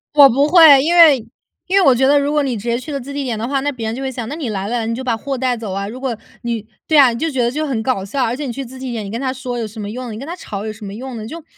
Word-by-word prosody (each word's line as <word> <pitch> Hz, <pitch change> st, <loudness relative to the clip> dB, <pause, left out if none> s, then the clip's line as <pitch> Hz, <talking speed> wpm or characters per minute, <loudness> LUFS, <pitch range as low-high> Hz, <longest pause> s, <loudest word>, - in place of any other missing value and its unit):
我 285 Hz, -2 st, +9 dB
不 275 Hz, +4 st, +2 dB
会， 315 Hz, -5 st, +8 dB
因 335 Hz, +5 st, +1 dB
为 325 Hz, -5 st, +8 dB, 0.5 s
因 380 Hz, +2 st, +2 dB
为 385 Hz, -, +5 dB
我 270 Hz, -, +7 dB
觉 265 Hz, +2 st, +2 dB
得 290 Hz, +1 st, +5 dB
如 285 Hz, 0 st, +1 dB
果 300 Hz, 0 st, +2 dB
你 265 Hz, -4 st, -1 dB
直 205 Hz, -, -7 dB
接 235 Hz, 0 st, 0 dB
去 280 Hz, -, -10 dB
了 280 Hz, -, -1 dB
自 275 Hz, +3 st, -9 dB
提 280 Hz, -1 st, -3 dB
点 235 Hz, -4 st, -2 dB
的 220 Hz, -, -3 dB
话， 275 Hz, 0 st, 0 dB
那 285 Hz, -, -1 dB
别 230 Hz, -3 st, -6 dB
人 220 Hz, -, -2 dB
就 255 Hz, -, -5 dB
会 265 Hz, -, -2 dB
想： 245 Hz, -3 st, -5 dB
“那 295 Hz, -, -4 dB
你 300 Hz, -7 st, -4 dB
来 195 Hz, -3 st, -3 dB
了 235 Hz, -1 st, -2 dB
你 230 Hz, -, -1 dB
就 260 Hz, -, -5 dB
把 240 Hz, -3 st, -1 dB
货 270 Hz, +3 st, -4 dB
带 250 Hz, -1 st, 0 dB
走 215 Hz, -4 st, -5 dB
啊。” 200 Hz, +1 st, -3 dB
如 255 Hz, -, -8 dB
果 260 Hz, -4 st, -3 dB, 0.3 s
你 230 Hz, -3 st, -3 dB, 0.2 s
对 310 Hz, -2 st, +3 dB
啊， 270 Hz, -3 st, +8 dB
你 230 Hz, -, -5 dB
就 325 Hz, -, 0 dB
觉 265 Hz, -4 st, -1 dB
得 240 Hz, 0 st, +1 dB
就 305 Hz, +3 st, -2 dB
很 230 Hz, -5 st, -2 dB
搞 210 Hz, -7 st, -1 dB
笑， 255 Hz, +6 st, -1 dB
而 230 Hz, -, 0 dB
且 290 Hz, -, -5 dB
你 250 Hz, -, -4 dB
去 275 Hz, -, -5 dB
自 260 Hz, +1 st, -11 dB
提 260 Hz, -2 st, -5 dB
点， 225 Hz, -2 st, -4 dB
你 195 Hz, -, -7 dB
跟 230 Hz, -, -4 dB
他 260 Hz, -1 st, -2 dB
说 255 Hz, -2 st, -5 dB
有 225 Hz, -, -3 dB
什 215 Hz, +2 st, -14 dB
么 205 Hz, -, -5 dB
用， 245 Hz, +1 st, -6 dB
你 -, -, -7 dB
跟 265 Hz, -, -7 dB
他 335 Hz, -, -5 dB
吵 210 Hz, -, -6 dB
有 215 Hz, -, -3 dB
什 215 Hz, -1 st, -10 dB
么 195 Hz, -, -7 dB
用 250 Hz, +3 st, -7 dB
呢？ 215 Hz, 0 st, -7 dB
就 325 Hz, +5 st, -8 dB
255 Hz, 400 characters per minute, -18 LUFS, 230-280 Hz, 0.5 s, 我